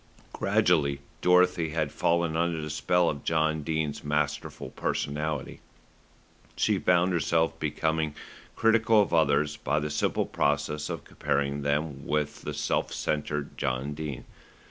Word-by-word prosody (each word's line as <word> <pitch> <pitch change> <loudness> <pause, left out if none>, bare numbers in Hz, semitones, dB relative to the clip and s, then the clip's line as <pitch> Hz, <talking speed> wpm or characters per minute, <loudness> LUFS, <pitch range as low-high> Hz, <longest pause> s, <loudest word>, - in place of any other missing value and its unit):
Gradually 70 -6 +2 0.2
Dorothy 90 -2 +4
had 80 -2 -1
fallen 85 -1 +1
under 85 0 0
the 75 -1 -4
spell 90 +4 +2
of 70 -2 -2
John 80 -1 +1
Dene's 75 -1 -2
masterful 75 0 -2
personality. 75 0 -3 1.0
She - - +2
found 90 +1 +3
herself 80 -1 +1
becoming 80 0 -1 0.4
critical 115 -1 +4
of 100 - +2
others 75 -2 +2
by 70 +2 0
the 75 0 -3
simple 75 - 0
process 75 +1 -1
of - - -4
comparing 70 +1 -1
them 70 0 -2
with 75 -1 -1
the - - -5
self - - -1
centred 75 -1 -3
John 65 +3 -1
Dene. 75 -4 -5
75 Hz, 130 wpm, -28 LUFS, 75-80 Hz, 1.0 s, Dorothy